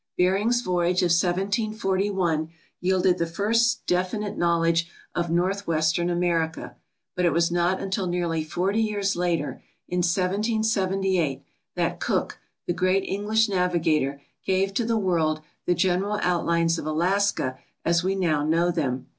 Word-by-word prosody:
Bering's 200 +7 +2
voyage 180 -1 +1
of 175 - +2
1741 190 -2 0 0.3
yielded 185 0 +2
the 170 - 0
first 230 +7 +1
definite 190 +4 -1
knowledge 170 0 +1 0.2
of 170 -1 -1
northwestern 170 -2 0
America, 170 -2 -1 0.4
but 180 - -1
it 175 - +4
was 170 +1 +2
not 175 +2 +1
until 190 -1 -2
nearly 170 -2 -1
40 190 +7 0
years 205 -2 0
later, 170 -4 -1 0.3
in 180 - -1
1778, 190 - 0 0.3
that - - -1
Cook, - - -1 0.3
the 175 - 0
great 185 +2 +1
English 215 +3 +1
navigator, 165 -7 +1 0.2
gave 195 +1 0
to 230 +3 0
the 230 0 +1
world 165 -6 +1 0.3
the 175 - +3
general 190 +4 +1
outlines 170 -1 +1
of - - -6
Alaska 175 -4 0 0.3
as 170 0 +2
we 190 +1 0
now 160 -6 +1
know 165 +3 +2
them. 135 -7 -2
180 Hz, 135 wpm, -25 LUFS, 170-195 Hz, 0.4 s, it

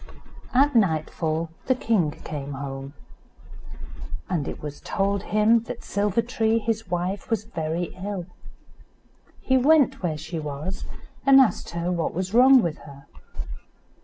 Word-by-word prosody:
At 280 +3 +4
nightfall 160 -4 +1 0.2
the 260 - +4
king 220 -10 +1
came 145 -2 -6
home, 135 +1 -6 1.3
and 155 -6 -1
it - - -5
was 145 -1 -7
told 200 0 0
him 215 +3 +3
that - - -7
Silver 205 +2 0
tree, 225 -2 +1
his 225 -2 -2
wife, 180 +3 -2
was 225 -3 0
very 170 -5 -3
ill. 200 -3 -3 1.2
He 260 - +3
went 285 +1 +4
where 165 -4 -1
she 160 +2 -5
was, 150 +5 -5 0.4
and 275 -1 +7
asked 240 -8 +2
her 170 +1 -1
what 170 -3 -1
was 185 +2 -3
wrong 255 +1 +7
with 165 -3 -2
her. 140 -2 -13
185 Hz, 135 wpm, -25 LUFS, 155-225 Hz, 1.3 s, and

